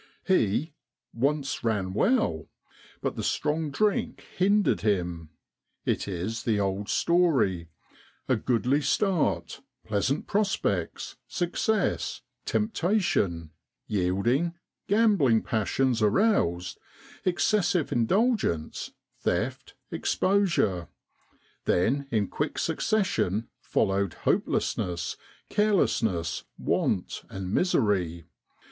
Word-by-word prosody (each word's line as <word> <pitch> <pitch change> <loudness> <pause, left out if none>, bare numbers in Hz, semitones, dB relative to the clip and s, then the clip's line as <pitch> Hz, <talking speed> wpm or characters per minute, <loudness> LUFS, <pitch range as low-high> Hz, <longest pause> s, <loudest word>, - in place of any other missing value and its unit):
He 150 - +1 0.2
' - - -60
once 140 +2 -1
ran 100 -5 0
well,' 105 - +1 0.6
but - - -1
the - - -3
strong 150 +1 0
drink 205 +7 0
hindered 200 +3 +3
him. 90 -6 -1 0.6
It - - 0
is 100 +4 -3
the 110 -3 +1
old 100 +1 -1
story 135 - +2 0.6
a - - +3
goodly 125 +4 +1
start, 140 - 0 0.2
pleasant 110 +7 0
prospects, 195 - -1
success, 195 +4 -1 0.2
temptation, 175 - 0 0.3
yielding, 110 - +1 0.3
gambling 200 - +4
passions 115 +2 0
aroused, 105 - +2 0.4
excessive 185 -2 +1
indulgence, 185 - 0 0.3
theft, - - -2 0.2
exposure: 175 - +1 0.8
then 135 +10 +1
in 105 -5 +1
quick - - -3
succession 115 - 0
followed 95 -3 0
hopelessness, 85 -2 -1 0.3
carelessness, 110 - +1
want, - - -1
and 95 0 -5
misery. 95 - +1
115 Hz, 85 wpm, -27 LUFS, -, 0.8 s, gambling